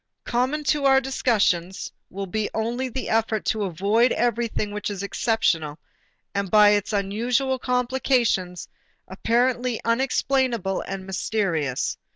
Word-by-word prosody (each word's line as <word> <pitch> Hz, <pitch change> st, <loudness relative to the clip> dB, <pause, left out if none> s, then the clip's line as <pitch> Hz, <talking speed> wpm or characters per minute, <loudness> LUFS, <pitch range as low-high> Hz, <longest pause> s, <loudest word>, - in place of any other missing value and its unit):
Common 260 Hz, +5 st, -1 dB
to 290 Hz, -1 st, +1 dB
our 270 Hz, -1 st, +6 dB
discussions 210 Hz, -9 st, 0 dB, 0.2 s
will 195 Hz, +1 st, -5 dB
be 210 Hz, +3 st, -2 dB
only 240 Hz, +4 st, -1 dB
the 260 Hz, +2 st, -4 dB
effort 225 Hz, -1 st, 0 dB
to 215 Hz, -2 st, 0 dB
avoid 200 Hz, +7 st, +2 dB
everything 235 Hz, -3 st, -1 dB
which 210 Hz, 0 st, -3 dB
is 200 Hz, -1 st, -5 dB
exceptional 165 Hz, -8 st, 0 dB, 0.6 s
and 200 Hz, -1 st, -2 dB
by 210 Hz, 0 st, +7 dB
its 205 Hz, 0 st, +1 dB
unusual 235 Hz, +6 st, 0 dB
complications 250 Hz, -8 st, 0 dB, 0.4 s
apparently 240 Hz, +4 st, 0 dB
unexplainable 240 Hz, -4 st, +1 dB
and 195 Hz, -1 st, -5 dB
mysterious. 185 Hz, -8 st, -1 dB
220 Hz, 120 wpm, -24 LUFS, 195-250 Hz, 0.6 s, by